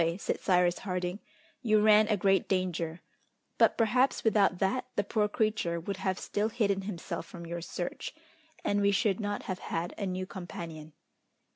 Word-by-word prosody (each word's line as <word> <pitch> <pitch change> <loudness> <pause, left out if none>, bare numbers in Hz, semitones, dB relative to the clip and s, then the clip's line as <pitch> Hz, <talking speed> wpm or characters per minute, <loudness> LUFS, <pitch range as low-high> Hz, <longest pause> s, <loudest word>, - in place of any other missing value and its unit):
said - - -2
Cyrus 180 -1 +3
Harding, 180 0 -3 0.4
"you 215 -4 +4
ran 215 0 +6
a 210 -2 +2
great 195 0 +2
danger, 175 -3 -1 0.6
but, - - +5
perhaps, 245 +4 +2
without 205 -4 +3
that, 220 +7 0
the 205 - +2
poor 210 +1 +1
creature 210 -6 0
would 195 +4 -4
have 190 -2 -1
still 210 +2 -1
hidden 200 -4 +1
himself 175 -3 -5
from 170 -2 -9
your 170 0 -4
search, 175 - -5 0.5
and 205 0 +2
we 200 - +4
should 200 0 +2
not 205 -1 -2
have 185 -1 -4
had 170 +2 -3
a 200 - -1
new 185 0 -2
companion." 165 -4 -8
195 Hz, 165 wpm, -30 LUFS, 175-210 Hz, 0.6 s, ran